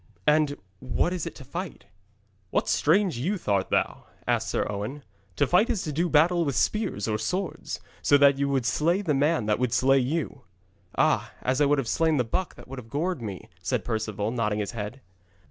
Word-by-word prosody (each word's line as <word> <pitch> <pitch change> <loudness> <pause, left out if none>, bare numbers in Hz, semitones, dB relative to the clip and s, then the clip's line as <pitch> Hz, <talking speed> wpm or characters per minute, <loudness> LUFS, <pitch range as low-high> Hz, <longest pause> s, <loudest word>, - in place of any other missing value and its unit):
'And 150 -1 +3 0.2
what 130 +7 0
is 180 -4 -3
it - - -7
to 135 - -10
fight?' 175 +6 -6 0.6
'What - - 0
strange 170 - +2
youth 185 +8 -2
art 100 -2 +1
thou?' - - 0 0.2
asked - - 0
Sir - - 0
Owen. 105 +8 -5 0.3
'To - - +3
fight 210 +8 +3
is 225 -6 0
to 155 - -3
do 170 +4 +1
battle 170 +3 +4
with 140 -5 -1
spears 215 - 0
or 110 -1 0
swords, 185 - -3 0.2
so 145 - +5
that 140 -1 +5
you 140 0 +1
would 135 -3 0
slay 170 +10 +1
the 160 -6 +1
man 145 -2 +2
that 105 +1 +1
would 125 -2 0
slay 135 +2 +4
you.' 140 +4 -2 0.6
'Ah, - - +2
as 130 +3 +1
I 145 - +5
would 145 +1 +3
have 135 -4 -1
slain 160 +4 +2
the 125 - +3
buck 180 +11 -2
that - - -13
would 135 0 -7
have 115 -2 -12
gored 160 +2 -1
me,' 100 -5 -6
said 85 - -1
Perceval, 110 -2 -2
nodding 110 -4 0
his 105 -1 -2
head. 115 +3 -6
140 Hz, 205 wpm, -26 LUFS, 115-165 Hz, 0.6 s, so